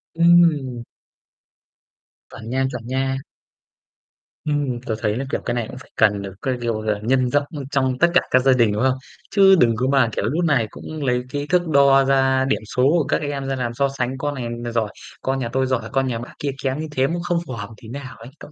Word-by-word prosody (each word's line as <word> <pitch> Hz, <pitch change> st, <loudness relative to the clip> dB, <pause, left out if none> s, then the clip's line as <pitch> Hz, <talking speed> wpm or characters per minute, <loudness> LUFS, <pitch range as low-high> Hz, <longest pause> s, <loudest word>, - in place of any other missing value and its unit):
Ừm. 165 Hz, -8 st, +4 dB, 1.5 s
Chuẩn 110 Hz, 0 st, -10 dB
nha, 130 Hz, +2 st, 0 dB
chuẩn 120 Hz, -3 st, -7 dB
nha. 135 Hz, +1 st, -1 dB, 1.3 s
Ừm, 145 Hz, -5 st, -1 dB
tớ 110 Hz, -, -1 dB
thấy 105 Hz, 0 st, 0 dB
là, 135 Hz, -, -2 dB
kiểu, -, -, -1 dB
cái 120 Hz, -, -1 dB
này 120 Hz, -2 st, -2 dB
cũng 125 Hz, -, -9 dB
phải 130 Hz, -, -14 dB
cần 105 Hz, -2 st, +3 dB
được, 100 Hz, -1 st, -7 dB
cái 130 Hz, -2 st, -1 dB
kiểu 115 Hz, -2 st, -1 dB
là, 105 Hz, -1 st, -1 dB
nhân 130 Hz, +2 st, +2 dB
rộng, 145 Hz, +3 st, +2 dB
ơ, 140 Hz, -, -4 dB
trong 130 Hz, -2 st, +1 dB
tất 170 Hz, 0 st, +4 dB
cả 180 Hz, -, +6 dB
các 130 Hz, -, +6 dB
gia 135 Hz, -, +5 dB
đình, 120 Hz, -4 st, +3 dB
đúng 105 Hz, +4 st, -1 dB
không? 130 Hz, 0 st, +2 dB, 0.3 s
Chứ 195 Hz, -1 st, +6 dB
đừng 115 Hz, -4 st, +4 dB
có 125 Hz, +4 st, -1 dB
mà, 135 Hz, -4 st, +4 dB
kiểu, -, -, -1 dB
nút 165 Hz, +6 st, 0 dB
này 135 Hz, -8 st, +2 dB
cũng 155 Hz, +5 st, -7 dB
lấy 125 Hz, -1 st, +1 dB
cái 145 Hz, +2 st, -4 dB
thước 180 Hz, -1 st, +2 dB
đo 140 Hz, -2 st, +5 dB
ra 135 Hz, -1 st, +3 dB
điểm 135 Hz, -, 0 dB
số 125 Hz, -, +2 dB
của 155 Hz, +4 st, +4 dB
các -, -, +1 dB
em 140 Hz, -2 st, -3 dB
ra 135 Hz, -, -1 dB
làm 120 Hz, -2 st, -3 dB
so 140 Hz, +3 st, +1 dB
sánh, 130 Hz, -1 st, -3 dB
con 145 Hz, +1 st, -3 dB
này 120 Hz, -2 st, -4 dB
n 120 Hz, 0 st, -5 dB
giỏi, 115 Hz, -2 st, 0 dB, 0.3 s
con 135 Hz, 0 st, -1 dB
nhà 120 Hz, -3 st, -3 dB
tôi 130 Hz, 0 st, +2 dB
giỏi, 130 Hz, -2 st, -2 dB
con 135 Hz, -2 st, +1 dB
nhà 120 Hz, -3 st, -2 dB
bác 120 Hz, -, -9 dB
kia 145 Hz, -, -1 dB
kém 135 Hz, +2 st, -1 dB
như 160 Hz, -, -3 dB
thế, 135 Hz, -2 st, +1 dB
nó 170 Hz, +3 st, -2 dB
không 175 Hz, -1 st, 0 dB
phù 130 Hz, -, -5 dB
hợp 105 Hz, -3 st, -6 dB
tí 110 Hz, -, -12 dB
nào 130 Hz, +2 st, -8 dB
ấy 115 Hz, +2 st, -11 dB
cậu -, -, -12 dB
130 Hz, 245 wpm, -21 LUFS, 120-140 Hz, 1.5 s, cả